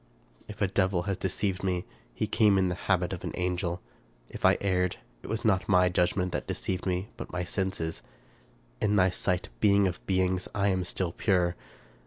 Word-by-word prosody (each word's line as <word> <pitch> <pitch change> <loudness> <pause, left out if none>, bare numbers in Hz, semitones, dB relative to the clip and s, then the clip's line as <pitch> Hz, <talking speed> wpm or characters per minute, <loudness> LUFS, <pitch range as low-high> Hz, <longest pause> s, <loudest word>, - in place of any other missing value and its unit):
If 105 0 -4
a - - +3
devil 95 -2 +1
has 100 +1 -1
deceived 95 +1 -1
me, 90 -2 0 0.3
he - - 0
came 105 -3 +4
in 95 -1 +3
the - - -1 0.2
habit 90 -1 +2
of 90 - -6
an - - -4
angel. 90 -1 -2 0.5
HI - - +3
erred, 90 -2 +1 0.3
it - - -10
was 110 0 -3
not 95 -4 +2
my 90 -2 +5
judgment 90 +1 +1
that - - -3
deceived 95 0 -2
me, 90 +3 -1
but 115 - -7
my 90 0 -2
senses. 95 -3 -2 0.8
In 105 -1 +2
thy 95 -2 +4
sight. 90 0 -1
Being 100 -1 +5
of 90 - -5
beings! 95 -1 +1
I 100 0 +2
am 95 -1 +1
still 90 -1 -2
pure. 90 -2 +1
95 Hz, 185 wpm, -29 LUFS, 90-100 Hz, 0.8 s, my